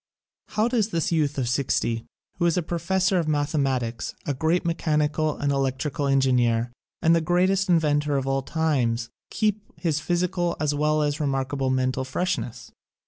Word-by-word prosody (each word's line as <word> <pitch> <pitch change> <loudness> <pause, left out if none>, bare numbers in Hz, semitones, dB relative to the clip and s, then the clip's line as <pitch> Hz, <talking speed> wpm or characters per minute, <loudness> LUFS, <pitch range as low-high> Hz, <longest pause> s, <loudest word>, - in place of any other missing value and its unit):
How 215 +2 +4
does 230 -4 +1
this 170 -5 -1
youth 150 -3 +1
of 130 -3 0
sixty, 120 -2 0 0.3
who 175 - +3
is 170 - +1
a 180 - +1
pro 170 +1 -3
fessor 190 +2 +1
of 165 - -1
mathematics, 135 -6 -1
a 145 - 0
great 160 +6 0
mechanical 155 -2 0
and 140 0 0
electrical 135 +2 -1
engineer 125 -4 +2 0.3
and 165 +1 +5
the 165 - +2
greatest 185 +3 +2
in 175 - +6
ventor 145 -2 +1
of 135 - -1
all 135 0 0
times, 130 -6 0 0.2
keep 215 -1 0 0.2
his 160 -4 0
physical 175 +1 0
as 150 -1 +1
well 150 +1 +1
as 145 0 -1
remarkable 135 -2 -1
mental 130 0 0
freshness? 130 -4 -3
150 Hz, 165 wpm, -25 LUFS, 135-170 Hz, 0.3 s, in